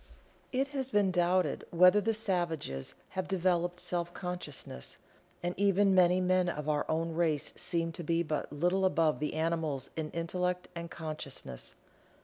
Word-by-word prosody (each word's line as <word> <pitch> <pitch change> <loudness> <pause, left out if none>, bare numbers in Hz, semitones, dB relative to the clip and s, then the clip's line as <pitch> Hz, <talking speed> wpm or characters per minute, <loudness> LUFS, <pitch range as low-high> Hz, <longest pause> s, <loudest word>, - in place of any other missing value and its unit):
It 270 +2 0
has 270 -2 -3
been 205 -5 +3
doubted 180 +1 +2
whether 180 +4 +6
the 225 +2 +1
savages 170 - -1
have 185 -1 -3
developed 175 -1 +1
Self 175 -1 -2
consciousness, 175 - -5 0.5
and 175 0 0
even 200 0 +4
many 180 0 +5
men 185 -1 +2
of 150 -3 -4
our 150 -1 0
own 165 +1 0
race 160 -3 0
seem 165 -1 0
to 170 - -7
be 165 +2 +1
but 155 -2 -3
little 175 +6 +1
above 165 -4 +3
the 150 0 -2
animals 160 -4 -1
in 155 -1 -3
intellect 180 +2 -2
and 170 -1 -6
consciousness. 155 - -6
175 Hz, 150 wpm, -31 LUFS, 160-185 Hz, 0.5 s, whether